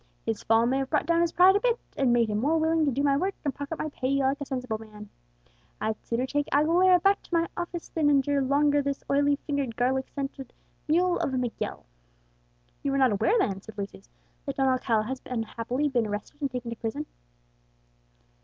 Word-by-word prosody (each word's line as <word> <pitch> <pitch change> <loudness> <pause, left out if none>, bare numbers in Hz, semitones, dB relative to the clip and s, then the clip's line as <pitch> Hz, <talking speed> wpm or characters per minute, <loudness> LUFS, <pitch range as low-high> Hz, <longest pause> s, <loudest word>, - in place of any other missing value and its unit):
His 225 -2 -2
fall 225 +1 +3
may 260 +3 +1
have 270 0 -3
brought 300 - +1
down 335 +1 +2
his 340 -1 +1
pride 370 +2 +6
a - - +4
bit, 480 +1 +1 0.2
and 265 -3 +2
made 235 -1 +3
him 210 -1 -1
more 300 +7 +2
willing 320 0 +2
to 280 - +1
do 275 +3 -1
my 280 -1 +3
work 380 +7 -1
and 285 - 0
pocket 285 +3 -5
my 310 - -3
pay, 260 -2 -2
like 275 +1 +1
a - - -2
sensible 250 -5 -3
man. 210 -1 -12 0.7
I'd 215 0 -3
sooner 240 +2 -1
take 290 +2 -1
Aguilera 345 +5 +4
back 400 +1 +4
to - - -20
my 335 0 +2
office 345 -1 -5
than 310 -3 +1
endure 280 0 +2
longer 285 +2 +3
this 280 0 -3
oily 285 +1 +3
fingered, 280 -6 -2
garlic 260 +2 0
scented 275 -2 -6 0.3
mule 350 +3 +2
of 265 - -1
a - - 0
Miguel." 245 -2 -3 1.0
"You 275 -1 -1
are - - +2
not 260 -3 +4
aware 210 - +2
then," 195 - 0
said 220 +1 -13
Lucius, 195 - -7 0.4
"that - - -3
Don 270 - +2
Alcala 245 -4 +1
has 260 +4 -5
unhappily 245 +3 -2
been 240 -5 0
arrested 210 +8 -6
and 280 - 0
taken 250 -2 -5
to 230 - -6
prison." 255 +7 -4
275 Hz, 210 wpm, -27 LUFS, 240-300 Hz, 1.0 s, pride